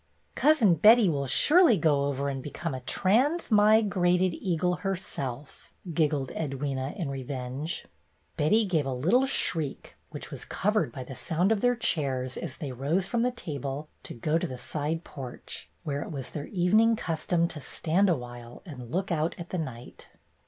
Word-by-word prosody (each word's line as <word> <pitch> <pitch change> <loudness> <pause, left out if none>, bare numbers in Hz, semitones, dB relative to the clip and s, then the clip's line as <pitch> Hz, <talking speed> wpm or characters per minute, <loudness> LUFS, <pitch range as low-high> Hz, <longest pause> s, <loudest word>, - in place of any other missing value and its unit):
"Cousin 270 - +4
Betty 215 +6 +6
will 140 -3 -1
surely 300 - +5
go 150 -4 +2
over 140 0 -1
and 135 -1 -3
be 145 - -6
come 165 +1 -4
a 130 - -4
trans 240 - +1
mi 215 +1 +6
grated 180 -2 +2
eagle 180 0 -1
herself," 145 -9 -5 0.2
giggled 150 -4 +1
Edwyna, 135 -1 -3
in 170 -6 -2
revenge. 135 +3 -4 0.5
Betty 210 +9 +3
gave 160 -7 0
a 135 - -1
little 225 - +3
shriek, 160 - -1
which - - -7
was - - -6
cov 210 +2 -1
ered 215 - +1
by 130 -4 -6
the 130 - -9
sound 175 - 0
of 215 -3 +1
their 245 0 +3
chairs 135 - 0
as - - -6
they 145 -4 -5
rose 145 +9 0
from 235 +3 -1
the 250 - +3
table 145 - -5
to - - -9
go 155 +7 0
to - - -2
the 130 - -7
side 150 +6 -3
porch, 130 -3 -8
where 145 -1 -2
it - - -6
was 135 -5 -6
their 145 -1 -5
evening 215 +5 +3
custom 170 -3 0
to 150 - -8
stand 180 +8 +1
a 175 - +4
while 120 -1 -10
and 125 -9 -9
look 185 +7 -2
out 160 0 0
at 175 0 -8
the 185 - -1
night. 125 -6 -8
160 Hz, 180 wpm, -28 LUFS, 135-195 Hz, 0.5 s, Betty